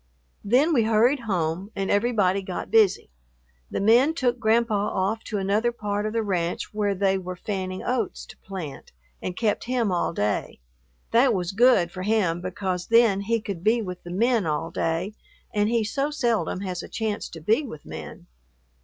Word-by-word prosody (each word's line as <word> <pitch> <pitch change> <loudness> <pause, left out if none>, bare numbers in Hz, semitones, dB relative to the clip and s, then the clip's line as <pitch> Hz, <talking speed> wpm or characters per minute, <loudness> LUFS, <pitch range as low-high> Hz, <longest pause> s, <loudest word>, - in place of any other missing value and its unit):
Then 260 +10 +3
we 245 - +4
hurried 230 +6 +3
home 175 +1 -1
and 195 -1 -1
everybody 205 -3 +2
got 185 -2 -6
busy. 215 - +3 0.6
The - - -3
men 240 +10 +4
took 250 -5 0
Grandpa 230 0 +2
off 210 +4 -1
to 210 - -3
another 205 +5 +1
part 210 -2 -2
of 215 - -4
the 230 -1 0
ranch 175 -3 -2
where 205 -1 0
they 190 0 +1
were 185 0 -6
fanning 185 0 -4
oats 245 -5 -2
to - - -14
plant, 165 - -8 0.3
and 180 - -4
kept 220 -3 0
him 240 -4 0
all 175 - 0
day. 105 -10 -2 0.5
That 240 0 +4
was 180 -2 -2
good 225 -5 +4
for 185 - -7
him 190 -5 +1
because 185 -1 -3
then 230 -4 +4
he 230 +3 0
could 200 -6 -6
be 220 +3 +3
with 180 -2 -6
the 175 - -10
men 220 +1 +1
all 155 +2 -2
day 165 +5 -1 0.4
and 210 0 +2
he 230 -1 +2
so 275 +7 -1
seldom 235 -9 0
has 180 -3 -4
a - - -10
chance 215 -2 -3
to 165 - -9
be 215 - +2
with 220 - -9
men. 80 -1 -9
205 Hz, 180 wpm, -25 LUFS, 185-230 Hz, 0.6 s, we